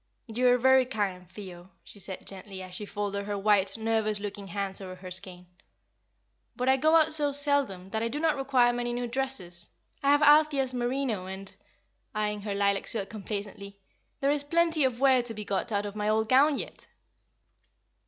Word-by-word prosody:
"You 245 +1 0
are 245 0 +5
very 260 0 +5
kind, 195 -7 -3
Theo," 185 -3 -10
she 205 - -12
said, 190 0 -8
gently, 190 0 -8
as 185 -1 -10
she 205 +3 -6
folded 200 -1 -3
her 205 0 -3
white, 200 0 +2
nervous 220 -2 0
looking 200 -1 -6
hands 195 +1 -3
over 185 -1 -7
her 185 0 -10
skein, 180 -1 -6 1.1
"but 250 0 -2
I 265 - +6
go 310 +4 +3
out 320 -1 +4
so 295 -2 0
seldom, 275 -10 -1
that 220 - -1
I 230 - 0
do 270 +6 -3
not 315 -1 +2
require 260 -3 +3
many 240 0 -2
new 245 0 -2
dresses. 235 -9 -4 0.3
I 275 - +2
have 290 +1 +5
Althea's 295 -3 +5
merino, 245 -5 -1
and" 190 +1 -7 0.6
eyeing 210 -1 -1
her 205 -1 -3
lilac 200 0 +1
silk 205 -3 -3
complacently 200 -1 -6 0.4
"there 275 +1 +3
is 290 -1 0
plenty 330 -1 +2
of 250 -2 -1
wear 265 -2 +5
to 235 -2 -7
be 210 0 -6
got 200 +4 -2
out 205 0 0
of 205 0 -6
my 210 0 -1
old 220 0 +2
gown 275 +4 +5
yet!" - - -7
220 Hz, 190 wpm, -28 LUFS, 200-265 Hz, 1.1 s, I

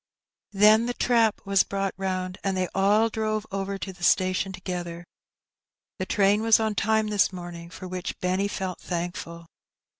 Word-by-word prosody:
Then 215 +3 +5
the 245 - -2
trap 230 -3 +2
was 195 -1 +4
brought 195 -1 -2
round, 185 -1 -3
and 195 -1 -1
they 185 -1 0
all 205 +3 +3
drove 215 -1 -2
over 195 0 -3
to 190 0 -6
the 175 -1 -13
station 185 +1 +2
together. 175 -2 -6 0.9
The - - -3
train 205 0 +3
was 225 0 +5
in 220 -1 0
time 220 +1 +1
this 205 -2 +2
morning, 175 -2 -8
for 185 - -9
which 180 0 -5
Benny 185 +2 0
felt 190 -2 -4
thankful. 170 -1 -5
195 Hz, 160 wpm, -26 LUFS, 185-210 Hz, 0.9 s, Then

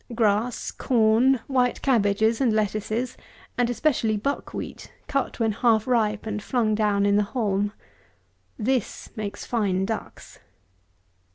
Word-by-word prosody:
Grass, 220 +1 +1
corn, 235 +2 +3
white 250 -2 0
cabbages, 220 -2 +2
and 250 -4 +3
lettuces, 215 +3 -1 0.4
and 245 -1 +1
especially 240 -4 +1
buck 280 +7 -3
wheat, - - -7
cut, 275 -2 -2
when 225 -1 +2
half 220 0 +2
ripe, 220 -4 +1
and 210 -1 -3
flung 225 -2 0
down 210 -2 +2
in 200 0 +3
the 210 - +3
haulm. 205 -3 +1 0.9
This 250 0 -2
makes 205 -2 -5
fine 195 -5 0
ducks. 220 +1 -6
220 Hz, 125 wpm, -25 LUFS, 210-245 Hz, 0.9 s, corn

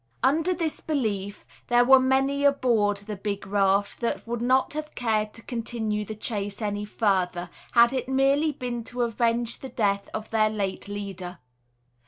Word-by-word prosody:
Under 325 +6 +3
this 325 -2 -2
belief, 210 -9 -2 0.2
there 240 0 +4
were 265 +1 +8
many 270 +2 +1
aboard 235 -7 +3
the 205 +1 -6
big 200 0 -4
raft 200 0 +1
that 235 - -2
would 235 0 -3
not 260 +3 +2
have 305 0 -6
cared 215 -3 0
to 230 - -10
continue 225 -3 -2
the 220 - -6
chase 205 -2 -3
any 205 -1 -2
further, 185 -5 0 0.2
had 235 +1 +6
it 260 0 -2
merely 275 +3 +3
been 245 -4 -4
to 245 +1 -2
avenge 235 0 0
the 265 - -7
death 200 -5 0
of 215 0 -6
their 215 -1 +3
late 200 -3 -3
leader. 195 -3 -6
225 Hz, 165 wpm, -26 LUFS, 205-255 Hz, 0.2 s, were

